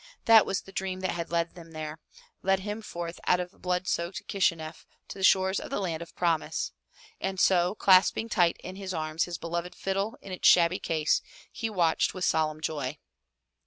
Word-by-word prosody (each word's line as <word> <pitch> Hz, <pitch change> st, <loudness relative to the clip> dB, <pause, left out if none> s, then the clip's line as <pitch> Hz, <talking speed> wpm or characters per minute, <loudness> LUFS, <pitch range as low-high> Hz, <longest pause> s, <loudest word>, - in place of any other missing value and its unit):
That 225 Hz, -2 st, +7 dB
was 195 Hz, -, -1 dB
the 195 Hz, -, -14 dB
dream 190 Hz, -1 st, -3 dB
that 185 Hz, -, 0 dB
had 170 Hz, -1 st, -4 dB
led 170 Hz, 0 st, -1 dB
him 165 Hz, -2 st, -12 dB
there, 155 Hz, 0 st, -6 dB, 0.4 s
led 190 Hz, 0 st, +2 dB
him 210 Hz, +2 st, -4 dB
forth 170 Hz, -4 st, -6 dB
out 180 Hz, -, +4 dB
of 180 Hz, +1 st, -7 dB
blood 180 Hz, 0 st, -1 dB
soaked 170 Hz, +2 st, -2 dB
Kishi 195 Hz, -4 st, +2 dB
neff 160 Hz, 0 st, -9 dB, 0.3 s
to -, -, -8 dB
the -, -, -4 dB
shores 190 Hz, +1 st, +4 dB
of -, -, -8 dB
the -, -, -2 dB
Land 170 Hz, -5 st, -2 dB
of 170 Hz, -, -10 dB
Promise. 170 Hz, -3 st, 0 dB, 0.5 s
And 190 Hz, -1 st, -3 dB
so, 180 Hz, +1 st, +3 dB
clasping 195 Hz, +3 st, +4 dB
tight 175 Hz, -6 st, +2 dB
in 185 Hz, +1 st, -7 dB
his 190 Hz, -2 st, -5 dB
arms 155 Hz, 0 st, -1 dB
his 175 Hz, -1 st, -5 dB
beloved 170 Hz, +2 st, -4 dB
fiddle 195 Hz, +3 st, -2 dB
in 195 Hz, -, -10 dB
its 185 Hz, -, +1 dB
shabby 175 Hz, +1 st, +5 dB
case, 155 Hz, -2 st, +1 dB, 0.3 s
he 225 Hz, -1 st, -3 dB
watched 175 Hz, -5 st, +1 dB
with 185 Hz, -2 st, -1 dB
solemn 155 Hz, -1 st, +1 dB
joy. 145 Hz, -5 st, -3 dB
180 Hz, 200 wpm, -28 LUFS, 165-190 Hz, 0.5 s, That